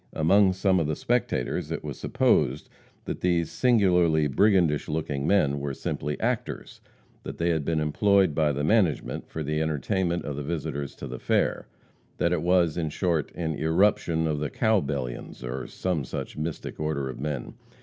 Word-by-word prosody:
Among 95 Hz, +5 st, +4 dB
some 95 Hz, 0 st, +2 dB
of 80 Hz, -, 0 dB
the 75 Hz, -, -1 dB
spectators 95 Hz, -, -1 dB
it -, -, -4 dB
was -, -, -5 dB
supposed -, -, +1 dB, 0.4 s
that -, -, -5 dB
these 85 Hz, -2 st, +1 dB
singularly 90 Hz, -10 st, +3 dB
brigandish 85 Hz, -1 st, +2 dB
looking 75 Hz, -2 st, -2 dB
men, 70 Hz, -8 st, +3 dB
were 70 Hz, -1 st, -3 dB
simply 75 Hz, 0 st, -3 dB
actors, -, -, -3 dB, 0.4 s
that -, -, -7 dB
they 85 Hz, +1 st, +1 dB
had 80 Hz, -2 st, 0 dB
been 80 Hz, +2 st, 0 dB
employed 95 Hz, +4 st, +3 dB
by 75 Hz, -1 st, +2 dB
the 70 Hz, +1 st, -2 dB
"management" 95 Hz, -3 st, +1 dB
for 80 Hz, -, -4 dB
the 75 Hz, +2 st, -1 dB
entertainment 85 Hz, +4 st, -1 dB
of 70 Hz, -, -4 dB
the 75 Hz, -, -4 dB
visitors 75 Hz, -2 st, -4 dB
to -, -, -7 dB
the -, -, -7 dB
fair -, -, 0 dB, 0.5 s
that -, -, +1 dB
it -, -, 0 dB
was, 85 Hz, -2 st, +2 dB
in 80 Hz, -3 st, -1 dB
short, 80 Hz, -2 st, -1 dB
an 80 Hz, -2 st, -2 dB
irruption 80 Hz, 0 st, +2 dB
of 75 Hz, -2 st, -1 dB
the 75 Hz, -1 st, -2 dB
"Cowbellions," 70 Hz, -, -1 dB
or 60 Hz, +1 st, -4 dB
some 90 Hz, -6 st, -2 dB
such -, -, -6 dB
mystic 75 Hz, +1 st, -5 dB
order 75 Hz, -3 st, -1 dB
of 65 Hz, -, -7 dB
men. 75 Hz, -2 st, -4 dB
80 Hz, 170 wpm, -26 LUFS, 75-90 Hz, 0.5 s, Among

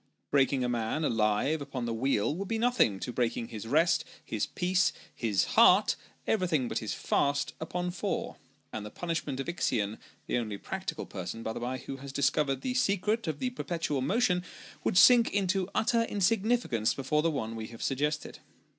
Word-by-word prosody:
Breaking 135 Hz, -2 st, +3 dB
a -, -, +1 dB
man 120 Hz, +5 st, -1 dB
alive 115 Hz, +5 st, +1 dB
upon 135 Hz, -3 st, -4 dB
the 115 Hz, -, -2 dB
wheel, 115 Hz, 0 st, +1 dB
would 190 Hz, +4 st, -4 dB
be 225 Hz, -, -1 dB
nothing 225 Hz, -, +2 dB
to 125 Hz, -, -4 dB
breaking 115 Hz, -1 st, -1 dB
his 115 Hz, -1 st, -7 dB
rest, 160 Hz, +7 st, +3 dB, 0.2 s
his -, -, -2 dB
peace, 185 Hz, +1 st, +1 dB, 0.2 s
his 105 Hz, -5 st, +1 dB
heart -, -, +6 dB, 0.3 s
everything 170 Hz, -, +1 dB
but -, -, -2 dB
his 110 Hz, -, -3 dB
fast 140 Hz, 0 st, 0 dB
upon 175 Hz, +2 st, -3 dB
four; 175 Hz, -, -3 dB, 0.4 s
and 110 Hz, -, -4 dB
the 105 Hz, -, -6 dB
punishment 155 Hz, -1 st, -3 dB
of 135 Hz, -, -3 dB
Ixion 115 Hz, -, -1 dB, 0.3 s
(the -, -, 0 dB
only 110 Hz, -3 st, -4 dB
practical -, -, -5 dB
person, 95 Hz, +5 st, -6 dB
by 110 Hz, -, -3 dB
the -, -, -5 dB
bye, 125 Hz, +2 st, -3 dB
who 135 Hz, +1 st, -7 dB
has 140 Hz, 0 st, -8 dB
discovered 140 Hz, -1 st, +1 dB
the 255 Hz, -, -2 dB
secret 215 Hz, -2 st, +1 dB
of 155 Hz, -2 st, -2 dB
the 250 Hz, +10 st, -2 dB
perpetual 165 Hz, -, -2 dB
motion) 180 Hz, -, +2 dB, 0.4 s
would -, -, +1 dB
sink 240 Hz, +4 st, +7 dB
into 195 Hz, -1 st, 0 dB
utter 230 Hz, +1 st, +3 dB
insignificance 210 Hz, -, +1 dB
before 140 Hz, +3 st, +1 dB
the 165 Hz, -, +2 dB
one 115 Hz, -7 st, -3 dB
we 110 Hz, -1 st, -5 dB
have 115 Hz, 0 st, -9 dB
suggested. 150 Hz, +2 st, -1 dB
140 Hz, 180 wpm, -30 LUFS, 120-180 Hz, 0.4 s, sink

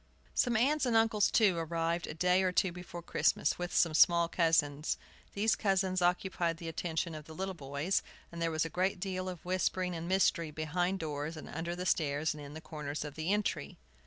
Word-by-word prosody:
Some 240 Hz, -3 st, +2 dB
aunts 275 Hz, +4 st, +2 dB
and 235 Hz, -, +1 dB
uncles, 225 Hz, -2 st, +4 dB
too, 200 Hz, -6 st, +4 dB
arrived 165 Hz, +1 st, -1 dB
a 155 Hz, -, -6 dB
day 180 Hz, +3 st, +3 dB
or 185 Hz, -1 st, +2 dB
two 185 Hz, 0 st, +2 dB
before 175 Hz, -1 st, -8 dB
Christmas, -, -, +1 dB
with 175 Hz, 0 st, -3 dB
some 165 Hz, -2 st, +3 dB
small 170 Hz, +1 st, +5 dB
cousins. 160 Hz, -3 st, +1 dB, 0.4 s
These 215 Hz, +2 st, +2 dB
cousins 190 Hz, -2 st, +1 dB
occupied 175 Hz, -1 st, +1 dB
the 165 Hz, -, -7 dB
attention 165 Hz, 0 st, -2 dB
of 155 Hz, -1 st, -8 dB
the 160 Hz, -, -11 dB
little 190 Hz, +2 st, -3 dB
boys, 145 Hz, +3 st, -1 dB, 0.3 s
and 170 Hz, 0 st, -7 dB
there 165 Hz, -, +1 dB
was 160 Hz, 0 st, 0 dB
a -, -, -1 dB
great 185 Hz, +3 st, 0 dB
deal 185 Hz, -1 st, -3 dB
of 180 Hz, -2 st, -8 dB
whispering 185 Hz, 0 st, 0 dB
and 165 Hz, 0 st, -5 dB
mystery, 185 Hz, -3 st, +2 dB
behind 175 Hz, +5 st, -1 dB
doors, 150 Hz, +1 st, -4 dB
and 155 Hz, -, -8 dB
under 170 Hz, +2 st, -4 dB
the 180 Hz, +1 st, -4 dB
stairs, 150 Hz, -2 st, +1 dB
and 150 Hz, -, -9 dB
in 145 Hz, +1 st, -9 dB
the 160 Hz, -, -7 dB
corners 150 Hz, -1 st, -5 dB
of 150 Hz, -, -6 dB
the 160 Hz, +5 st, -2 dB
entry. 210 Hz, 0 st, -1 dB
170 Hz, 205 wpm, -32 LUFS, 160-185 Hz, 0.4 s, small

